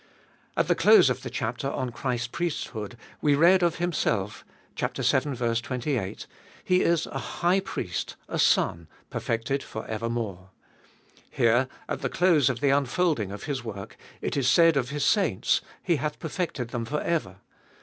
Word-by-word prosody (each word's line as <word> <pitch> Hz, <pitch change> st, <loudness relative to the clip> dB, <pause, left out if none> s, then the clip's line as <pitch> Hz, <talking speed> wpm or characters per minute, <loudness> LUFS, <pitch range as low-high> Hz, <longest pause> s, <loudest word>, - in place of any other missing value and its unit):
At -, -, +2 dB
the -, -, +4 dB
close -, -, +6 dB
of -, -, -3 dB
the -, -, -6 dB
chapter -, -, -3 dB
on 130 Hz, -1 st, -3 dB
Christ's 120 Hz, -1 st, -2 dB
priesthood 120 Hz, -7 st, -4 dB, 0.2 s
we 145 Hz, -1 st, +4 dB
read 175 Hz, +5 st, +5 dB
of 170 Hz, -2 st, +2 dB
Himself 115 Hz, -, -1 dB, 0.3 s
(vii. 135 Hz, +1 st, 0 dB, 0.2 s
28): 120 Hz, -4 st, -3 dB, 0.4 s
He 180 Hz, 0 st, +3 dB
is 170 Hz, -2 st, +2 dB
a -, -, -5 dB
High 180 Hz, +2 st, +1 dB
Priest, 90 Hz, -, -4 dB
a -, -, -3 dB
Son, 85 Hz, -1 st, +2 dB, 0.2 s
perfected 115 Hz, +5 st, -1 dB
for 110 Hz, -, -7 dB
evermore. 110 Hz, -4 st, -4 dB, 0.8 s
Here 120 Hz, +3 st, +3 dB, 0.2 s
at -, -, -3 dB
the -, -, -1 dB
close 165 Hz, -7 st, +3 dB
of 125 Hz, -2 st, -3 dB
the 140 Hz, -, +3 dB
unfolding 140 Hz, -, +1 dB
of 100 Hz, 0 st, -7 dB
His 140 Hz, -5 st, -3 dB
work, 100 Hz, -4 st, -7 dB, 0.3 s
it -, -, -2 dB
is 135 Hz, -3 st, +2 dB
said 165 Hz, -1 st, +5 dB
of 130 Hz, -3 st, 0 dB
His 145 Hz, 0 st, -1 dB
saints: 190 Hz, -, +2 dB, 0.2 s
He 170 Hz, -, +2 dB
hath 150 Hz, +2 st, -3 dB
perfected 160 Hz, -7 st, -3 dB
them 120 Hz, -1 st, -3 dB
for 150 Hz, +6 st, -2 dB
ever. 155 Hz, -, -1 dB
130 Hz, 160 wpm, -26 LUFS, 115-165 Hz, 0.8 s, close